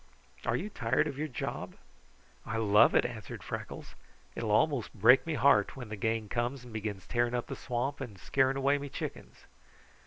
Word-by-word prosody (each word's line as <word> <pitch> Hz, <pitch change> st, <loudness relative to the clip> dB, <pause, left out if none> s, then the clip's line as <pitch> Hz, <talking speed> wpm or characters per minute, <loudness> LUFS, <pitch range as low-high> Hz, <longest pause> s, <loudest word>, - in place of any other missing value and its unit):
Are -, -, +2 dB
you 210 Hz, +4 st, -3 dB
tired 125 Hz, +2 st, +1 dB
of 140 Hz, -2 st, -5 dB
your 155 Hz, -, -1 dB
job?" 125 Hz, -, -5 dB, 0.7 s
"I 115 Hz, -, -3 dB
love 105 Hz, 0 st, +5 dB
it," -, -, +5 dB
answered 115 Hz, -4 st, -6 dB
Freckles. -, -, -6 dB, 0.4 s
"It -, -, -5 dB
will 115 Hz, -, -2 dB
almost 125 Hz, +3 st, +2 dB
break 115 Hz, +8 st, +6 dB
me 160 Hz, -, -1 dB
heart 135 Hz, -8 st, +4 dB
when 120 Hz, -4 st, -7 dB
the 110 Hz, -, -4 dB
gang 110 Hz, +1 st, -1 dB
comes 120 Hz, +4 st, -2 dB
and 120 Hz, -2 st, -12 dB
begins 105 Hz, -3 st, -4 dB
tearing 120 Hz, 0 st, 0 dB
up 120 Hz, -, -1 dB
the -, -, -6 dB
swamp 130 Hz, +3 st, -3 dB
and 115 Hz, -7 st, -6 dB
scaring 135 Hz, +7 st, +1 dB
away 140 Hz, +1 st, +2 dB
me 140 Hz, 0 st, -6 dB
chickens." -, -, -7 dB
120 Hz, 190 wpm, -31 LUFS, 110-135 Hz, 0.7 s, break